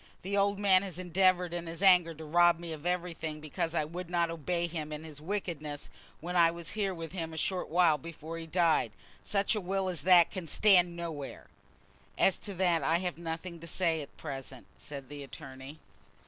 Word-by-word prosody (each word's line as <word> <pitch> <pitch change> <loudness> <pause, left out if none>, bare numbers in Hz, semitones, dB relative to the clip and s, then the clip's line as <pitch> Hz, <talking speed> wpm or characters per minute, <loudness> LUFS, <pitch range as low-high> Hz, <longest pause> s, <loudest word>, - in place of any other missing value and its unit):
"The 195 +2 -2
old 200 0 +2
man 195 -2 +5
has 190 -4 -5
endeavoured 180 0 +2
in 175 -1 -3
his 165 +3 -5
anger 175 -4 +6
to 160 +1 -9
rob 175 +2 +5
me 170 -1 -6
of 155 +2 -6
everything 170 -3 -2
because 155 +2 -3
I 155 - +2
would 170 +3 -7
not 170 -1 +1
obey 170 +2 -1
him 155 -3 -4
in 150 +1 -5
his 150 -2 -10
wickedness 155 -5 -4 0.3
when 175 +3 -4
I 170 -1 +6
was 170 -1 -5
here 205 -2 -1
with 165 -3 -6
him 165 -3 -4
a - - -8
short 185 +3 -1
while 165 -3 +4
before 165 +2 -7
he 165 - -7
died. 165 - +2 0.3
Such 200 +1 +1
a 210 - -1
will 190 +1 -1
as 175 -6 -2
that 175 0 +6
can 185 -4 -5
stand 180 -1 +4
nowhere." 160 -5 -6 0.7
"As 190 - +3
to 200 -2 -6
that 175 -3 +2
I 160 +4 +2
have 180 -1 -3
nothing 170 +1 -5
to 170 - -9
say 165 -2 +1
at 140 - -11
present," 135 -4 -7
said 140 -3 -8
the 145 +1 -8
attorney. 135 0 -10
170 Hz, 205 wpm, -31 LUFS, 155-180 Hz, 0.7 s, anger